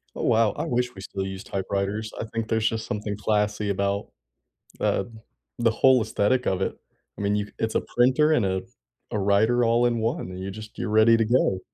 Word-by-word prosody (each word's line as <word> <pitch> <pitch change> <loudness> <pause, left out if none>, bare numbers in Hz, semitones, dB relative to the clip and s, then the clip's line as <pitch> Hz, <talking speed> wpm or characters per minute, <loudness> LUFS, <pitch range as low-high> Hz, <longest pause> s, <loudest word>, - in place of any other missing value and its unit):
Oh, - - -4
wow. 115 -3 +3
I - - -4
wish 125 0 -1
we 95 - -10
still 95 0 -4
used 95 0 -7
typewriters. 100 +2 -2
I - - -3
think 115 0 -4
there's 110 -1 +1
just 110 0 -4
something 105 0 -4
classy 105 0 0
about, 100 +1 -1 0.7
uh, - - +1 0.5
the 115 -1 +3
whole 130 +2 +4
aesthetic 110 +3 +1
of 95 0 0
it. - - -2 0.4
I - - -7
mean, 100 +1 +1
you 105 0 -1
c - - -18
it's 110 0 -1
a - - +1
printer 130 +6 +3
and 115 -10 +3
a 95 0 -1 0.5
a 105 - 0
writer 110 +5 +3
all 115 +1 +3
in 120 -1 +1
one, 110 -4 -2
and 90 - -7
you 95 - -4
just 110 +2 -10
you're - - -2
ready 110 +2 +6
to 115 - +3
go. 110 -4 +2
110 Hz, 215 wpm, -25 LUFS, 100-115 Hz, 0.7 s, ready